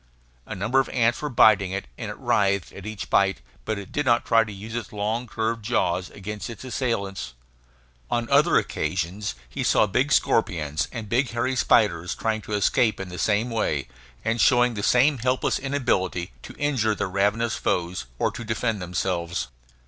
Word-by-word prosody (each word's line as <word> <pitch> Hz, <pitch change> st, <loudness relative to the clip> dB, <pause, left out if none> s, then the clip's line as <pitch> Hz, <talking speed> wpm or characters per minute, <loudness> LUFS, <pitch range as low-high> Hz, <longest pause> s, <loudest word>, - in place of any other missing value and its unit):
A -, -, -5 dB
number 110 Hz, +8 st, +1 dB
of 135 Hz, -, 0 dB
ants 120 Hz, -2 st, +1 dB
were 150 Hz, -, -2 dB
biting 105 Hz, -6 st, +5 dB
it, 100 Hz, -, -3 dB
and -, -, -6 dB
it -, -, -7 dB
writhed 100 Hz, -2 st, +1 dB
at -, -, -9 dB
each 110 Hz, -2 st, -5 dB
bite, 95 Hz, -5 st, +3 dB, 0.3 s
but 100 Hz, -3 st, -4 dB
did 150 Hz, -, 0 dB
not 120 Hz, -3 st, +2 dB
try 115 Hz, -1 st, +4 dB
to 105 Hz, -, -8 dB
use 105 Hz, +3 st, -8 dB
its 115 Hz, -4 st, -4 dB
long 110 Hz, +4 st, -2 dB
curved 115 Hz, 0 st, -2 dB
jaws 95 Hz, -5 st, 0 dB
against 105 Hz, +2 st, -6 dB
its 115 Hz, 0 st, -8 dB
assailants. 100 Hz, -, -3 dB, 0.7 s
On 120 Hz, -1 st, 0 dB
other 150 Hz, +5 st, +5 dB
occasions 95 Hz, +1 st, -2 dB
he -, -, -5 dB
saw -, -, +4 dB
big 125 Hz, +8 st, 0 dB
scorpions 80 Hz, -, +1 dB
and 115 Hz, -3 st, -6 dB
big 125 Hz, +4 st, +1 dB
hairy 120 Hz, +2 st, -1 dB
spiders 90 Hz, -8 st, +2 dB
trying 110 Hz, -1 st, -1 dB
to 105 Hz, -, -7 dB
escape 105 Hz, +2 st, +2 dB
in 95 Hz, -1 st, -5 dB
the 90 Hz, -, -7 dB
same 110 Hz, +3 st, +1 dB
way, 75 Hz, -11 st, -1 dB, 0.4 s
and 115 Hz, 0 st, +1 dB
showing 120 Hz, +2 st, +4 dB
the 105 Hz, -, -4 dB
same 125 Hz, +6 st, +3 dB
helpless 125 Hz, +2 st, +1 dB
inability 120 Hz, -, -1 dB
to -, -, -11 dB
injure 130 Hz, -8 st, +1 dB
their 100 Hz, -, -2 dB
ravenous 100 Hz, +4 st, +1 dB
foes, 85 Hz, -7 st, -2 dB
or -, -, +1 dB
to 120 Hz, -, -7 dB
defend 110 Hz, -1 st, -1 dB
themselves. 85 Hz, -4 st, -2 dB
110 Hz, 180 wpm, -25 LUFS, 95-120 Hz, 0.7 s, biting